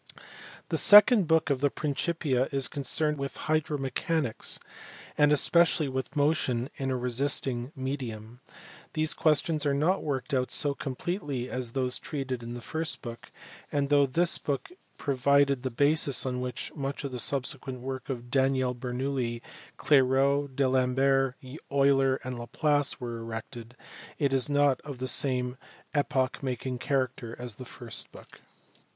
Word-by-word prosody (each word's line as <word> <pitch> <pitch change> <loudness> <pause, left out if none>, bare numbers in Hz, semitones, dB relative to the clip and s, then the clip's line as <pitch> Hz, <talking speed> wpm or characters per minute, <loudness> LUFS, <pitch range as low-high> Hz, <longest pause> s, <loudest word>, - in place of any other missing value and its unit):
The - - +1
second 210 -2 +8
book 160 -2 +2
of 135 -2 0
the 145 - +3
Principia 145 -3 -1
is 135 -2 +2
concerned 150 +1 -1
with 140 0 -5
hydromechanics, 150 -3 -1 0.6
and 145 0 +4
especially 165 +1 +3
with 130 +2 -4
motion 145 -3 0
in 135 -1 -2
a 130 - 0
resisting 125 0 0
medium. 125 -4 -5 0.5
These 155 0 +1
questions 155 0 +2
are 140 -2 +1
not 160 +7 +1
worked 140 -2 -3
out 130 -1 +1
so 145 -1 +1
completely 140 -2 -4
as 125 -2 -3
those 130 -2 0
treated 135 -4 -4
in 120 +1 -7
the 120 - -8
first 160 +4 -3
book; 120 -1 -8 0.4
and, 140 -1 0
though 145 -1 +4
this 170 +6 +3
book 145 - -3 0.3
provided 140 0 +2
the 130 - -2
basis 140 +2 +3
on 125 -1 -2
which 125 -2 -5
much 140 -1 -4
of 140 - -4
the 125 - -5
subsequent 130 0 -1
work 130 +1 -6
of 120 -2 -5
Daniel 130 -1 +2
Bernoulli, 125 -1 -3 0.3
Clairaut, 135 0 +2
D 140 - +1
Alembert, 130 +1 +2 0.4
Euler, 135 -1 +3
and 125 -2 -5
Laplace 145 +5 0
was 120 -2 -5
erected, 115 +1 -8 0.4
it 140 -2 0
is 135 +1 +3
not 145 -2 +2
of 145 -3 -8
the 130 +1 -4
same 125 -2 +2 0.4
epoch 140 -3 0
making 130 -1 -3
character 130 -4 -2
as 125 -2 -5
the - - -7
first 120 -2 -6
book. - - -15
135 Hz, 145 wpm, -28 LUFS, 125-145 Hz, 0.6 s, second